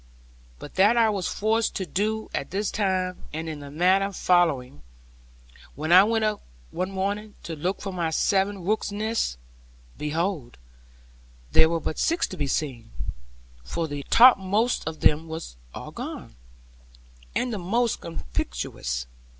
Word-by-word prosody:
But 145 - -10
that 205 +5 +5
I 225 -2 +5
was 195 -4 -1
forced 220 +2 0
to 190 - -2
do 215 +4 -1
at - - -2
this 200 +1 -1
time, 185 -3 0
and 160 +1 -4
in 155 -2 -5
the 145 -1 -9
manner 185 +6 +3
following. 160 - +2 0.9
When 155 +4 -3
I 185 +2 +10
went 225 +1 +1
up 215 -1 -1 0.3
one 185 +2 -2
morning 200 +2 -3
to 165 - -5
look 180 +6 -2
for 195 -2 -4
my 170 -3 -1
seven 195 +3 +1
rooks' 215 +1 0
nests, 215 - -1 0.6
behold 155 -3 -2 0.9
there 160 - +6
were 165 0 0
but 160 - -4
six 335 +2 +2
to - - -6
be 145 - -1
seen; 130 - -2 0.7
for 165 - -2
the 145 -1 -5
topmost 225 -3 +5
of 160 -1 -5
them 150 - +5
all 165 - -14
was 160 - -6 0.4
gone, - - -7 1.0
and 250 -2 0
the 210 - -3
most 230 +6 0
conspicuous. - - -4
185 Hz, 150 wpm, -26 LUFS, 155-210 Hz, 1.0 s, I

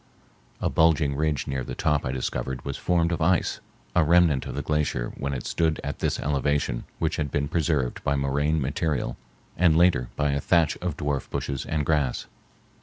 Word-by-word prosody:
A - - 0
bulging 80 -3 +3
ridge 75 -1 0
near 65 -1 -2
the 60 - -6
top 75 -3 +1
I - - -1
discovered 65 0 -3
was 70 - -3
formed 85 -1 +1
of 85 - -2
ice, 90 +1 +2 0.4
a 90 - +5
remnant 80 -4 +4
of - - -5
the - - -3
glacier 75 -5 -1
when 70 0 -3
it 65 -3 -4
stood 80 -2 0
at 70 - -4
this - - 0
elevation 70 -3 0
which - - -1
had 75 -2 -1
been 70 +1 -1
preserved 75 -5 0
by 70 - +1
moraine 70 +3 +1
material 70 -2 -1 0.4
and 85 -2 +4
later 85 -9 +3
by 75 -1 +1
a 70 0 -1
thatch 85 -1 +3
of 90 -4 -4
dwarf 70 -3 -2
bushes 70 -2 -3
and 75 -2 -1
grass. 75 -5 0
75 Hz, 185 wpm, -26 LUFS, 70-80 Hz, 0.4 s, a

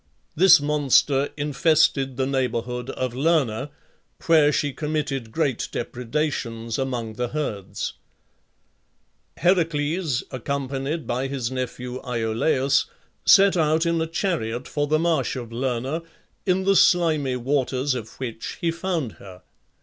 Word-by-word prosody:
This 175 0 +7
monster 145 -1 +2
infested 145 -3 +2
the 130 - +1
neighbourhood 125 -2 -2
of 130 -2 -3
Lerna, 135 -3 +1 0.6
where 155 -4 +5
she 145 -1 0
committed 145 -6 -3
great 135 -3 -1
depredations 120 -2 -3
among 120 -4 -3
the 125 - -1
herds. 110 -10 -4 1.4
Heracles, 165 -4 +1
accompanied 140 +4 -3
by 125 +3 -1
his 130 -3 -3
nephew 125 0 -4
Iolaus, 125 +3 +1 0.4
set 195 0 +7
out 160 0 +2
in 170 -1 +1
a 160 - -1
chariot 150 - -2
for 145 -1 -1
the 155 +1 +3
marsh 165 -2 0
of 120 -3 -6
Lerna, 130 +5 -2 0.5
in 185 +1 +2
the 195 +1 +3
slimy 155 -8 +3
waters 130 +1 0
of 115 -3 -5
which 115 -4 -5
he 170 - 0
found 170 -7 -2
her. 95 -2 -12
135 Hz, 120 wpm, -24 LUFS, 125-155 Hz, 1.4 s, This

